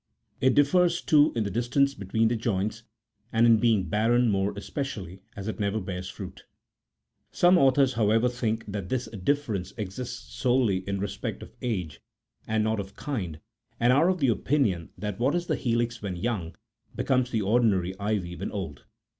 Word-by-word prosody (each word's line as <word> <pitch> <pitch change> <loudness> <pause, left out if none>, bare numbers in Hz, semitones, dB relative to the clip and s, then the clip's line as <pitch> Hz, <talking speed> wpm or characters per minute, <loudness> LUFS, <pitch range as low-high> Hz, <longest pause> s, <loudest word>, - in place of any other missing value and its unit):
It 130 - +3
differs, 170 +4 +4
too, 150 -2 +4
in 115 - +1
the 100 - -3
distance 125 +6 +1
between 110 0 0
the 120 - 0
joints, 110 -1 -1 0.5
and 115 +1 +4
in 115 -1 +6
being 110 -3 +3
barren 115 +5 +3
more 100 0 +1
espe 100 +8 -5
cially, 95 -9 -5 0.2
as 100 0 -6
it 110 - -4
never 100 +1 0
bears 90 -1 -5
fruit. - - -9 0.9
Some 175 +1 +5
authors, 135 -4 +4
however, 115 +1 +3
think 115 -2 -2
that 100 -3 -5
this 125 -2 -1
difference 105 -3 -2
exists 120 +4 -6
solely 120 -5 +2
in 100 0 -1
respect 100 +1 -4
of - - -12
age 95 - -3 0.5
and 110 0 +1
not 110 0 0
of 100 0 -7
kind, 90 - -4 0.4
and 120 +2 +4
are 155 +7 +4
of 185 -5 0
opinion 120 - +1
that 105 -1 -4
what 130 +7 +2
is 175 0 -1
the - - 0
helix 120 -1 -1
when 100 -3 -3
young, 90 -4 -3 0.4
becomes 130 -1 +1
the 110 -4 0
ordinary 100 -4 +2
ivy 100 -4 -2
when - - -5
old. 80 -10 -6
110 Hz, 170 wpm, -27 LUFS, 100-125 Hz, 0.9 s, in